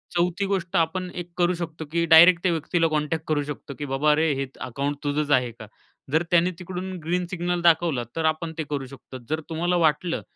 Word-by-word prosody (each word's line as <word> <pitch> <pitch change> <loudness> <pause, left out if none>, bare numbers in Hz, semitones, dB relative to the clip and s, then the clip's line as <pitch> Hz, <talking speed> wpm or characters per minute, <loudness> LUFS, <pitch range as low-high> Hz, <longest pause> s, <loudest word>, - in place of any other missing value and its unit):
चौथी 180 +3 +1
गोष्ट 190 -3 -2
आपण 180 +2 0
एक 175 -1 -6
करू 175 0 +3
शकतो 165 -2 -6
की 170 +1 +1
डायरेक्ट 170 +2 +8
त्या 180 - +3
व्यक्तीला 165 +1 +1
कॉन्टॅक्ट 155 +1 -1
करू 150 -2 +1
शकतो 145 -1 -7
की 145 - -3
"बाबा 145 +2 +2
रे, 160 0 +2
हे 135 0 -2 0.2
अकाउंट 140 +3 -2
तुझंच 145 0 -1
आहे 125 -3 +3
का?" 110 -1 -12 0.4
जर 160 +3 +2
त्याने 175 +1 +4
तिकडून 185 +1 -5
ग्रीन 180 +2 -1
सिग्नल 175 0 -1
दाखवला 165 -6 +3
तर 165 - -1
आपण 160 0 -7
ते 160 - -1
करू 140 -2 -3
शकतो. 130 -1 -11
जर 155 +1 -1
तुम्हाला 170 +2 0
वाटलं 165 +3 -1
160 Hz, 205 wpm, -24 LUFS, 150-175 Hz, 0.4 s, डायरेक्ट